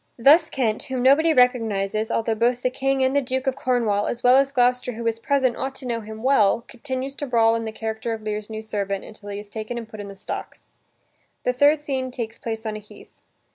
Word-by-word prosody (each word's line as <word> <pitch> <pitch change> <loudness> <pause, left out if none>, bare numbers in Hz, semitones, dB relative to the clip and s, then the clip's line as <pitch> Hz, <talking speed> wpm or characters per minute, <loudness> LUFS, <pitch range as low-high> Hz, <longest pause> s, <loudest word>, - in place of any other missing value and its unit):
Thus 310 +7 +6
Kent, 225 -5 -1
whom 260 -3 -3
nobody 300 +5 +5
recognizes, 225 -5 +2
altho 225 -1 0
both 240 +2 +1
the 255 - +1
King 270 0 0
and 260 +1 +1
the 285 - +4
Duke 260 +1 -2
of 265 -1 0
Cornwall, 230 -6 0
as 240 - -4
well 250 +1 +6
as 275 0 +3
Gloucester 250 -1 +2
who 230 +1 -6
is 225 0 0
present, 265 -1 +1
ought 265 0 -4
to 265 - -9
know 235 -2 -2
him 220 +1 -9
well, 235 -5 +4
continues 260 +1 -5
to 290 - -4
brawl, 225 -2 +4
in 230 0 -2
the 220 - -4
character 220 +1 -4
of 220 -1 -4
Lear's 210 0 -4
new 220 0 -6
servant, 200 -2 -3
until 215 -1 -10
he 200 - -4
is 205 0 -8
taken 220 +2 -5
and 230 -2 -6
put 215 -1 -11
in 205 - -6
the 200 - -9
stocks. 190 - -7 0.7
The 250 - +1
third 290 +3 +4
scene 265 -3 -2
takes 235 -3 -6
place 225 -1 -5
on 215 -1 -3
a - - -5
heath. 210 - -17
235 Hz, 235 wpm, -23 LUFS, 220-260 Hz, 0.7 s, Thus